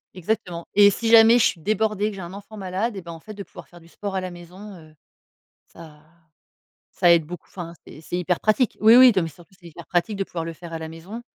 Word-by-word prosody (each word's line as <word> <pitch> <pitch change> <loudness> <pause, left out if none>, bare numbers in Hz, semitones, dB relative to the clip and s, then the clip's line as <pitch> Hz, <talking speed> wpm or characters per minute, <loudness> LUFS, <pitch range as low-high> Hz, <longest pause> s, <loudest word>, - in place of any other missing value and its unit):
Exactement. 180 -2 -3
Et 205 0 +7
si 225 +3 -2
jamais 230 +1 +7
je 235 - +4
suis 165 - -1
débordée, 215 +2 0
que 205 - -8
j'ai 190 - -8
un 175 - -9
enfant 205 +2 -11
malade, 195 +4 -3
eh 190 - -6
ben 170 - -9
en 165 - -10
fait 215 +6 -11
de 200 - -7
pouvoir - - -14
faire 175 - -16
du 165 - -19
sport 200 +2 -7
à 190 - -1
la 185 -1 -6
maison, 180 +4 -12
heu, 155 -3 -16 0.7
ça 155 -3 -15 0.9
ça 175 -2 +3
aide 165 -2 +3
beaucoup, 180 +3 -10
enfin 170 -2 -8
c'est 150 - -12
c'est 175 - -5
hyper 180 0 -1
pratique 215 +3 +1
oui 225 +2 +7
oui, 255 -2 +8
non 185 - +2
mais 165 - -4
surtout 175 +5 -19
c'est 175 - -15
hyper 170 +1 -12
pratique 180 +4 -1
de 195 - -1
pouvoir 165 -3 -5
le 165 - -5
faire 165 0 -11
à 165 - -4
la 160 - -7
maison. 180 +9 -9
185 Hz, 260 wpm, -23 LUFS, 170-210 Hz, 0.9 s, oui